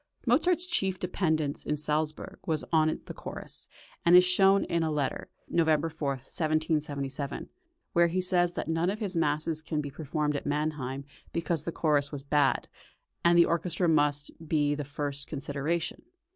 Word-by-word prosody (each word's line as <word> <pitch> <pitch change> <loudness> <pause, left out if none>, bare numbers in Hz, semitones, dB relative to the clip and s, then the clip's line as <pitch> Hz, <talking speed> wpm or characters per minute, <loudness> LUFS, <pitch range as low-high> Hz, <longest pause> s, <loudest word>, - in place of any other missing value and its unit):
Mozart's 340 +8 +3
chief 195 - +1
dependence 160 -6 -1
in 150 - -1
Salzburg 150 +1 -2
was 155 -2 0
on 155 -1 +3
the - - -7
chorus, - - -5 0.4
as 170 +1 +6
is 180 - +9
shown 195 +2 +5
in 170 - 0
a 160 - +1
letter 150 -3 -2 0.2
(November 160 -1 +2
4, 145 -2 -2
1777), 150 0 -2 0.4
where 170 0 +5
he 175 +2 -1
says 180 -1 +2
that - - -4
none 165 +2 +1
of 205 - -2
his 200 -4 -4
masses 155 0 +1
can 155 -1 -2
be 145 -1 -4
performed 150 0 -2
at 145 - -3
Mannheim, 145 -3 -2 0.3
because 165 -1 -1
the 170 - -2
chorus 145 -4 +1
was 140 -2 -6
bad, 145 -1 +2 0.6
and 170 0 +5
the 170 - +7
orchestra 170 +1 0
must 145 -2 +2 0.2
be 145 -2 +2
the 145 0 -3
first 145 0 -3
consideration. 150 +3 -2
155 Hz, 160 wpm, -29 LUFS, 145-170 Hz, 0.6 s, is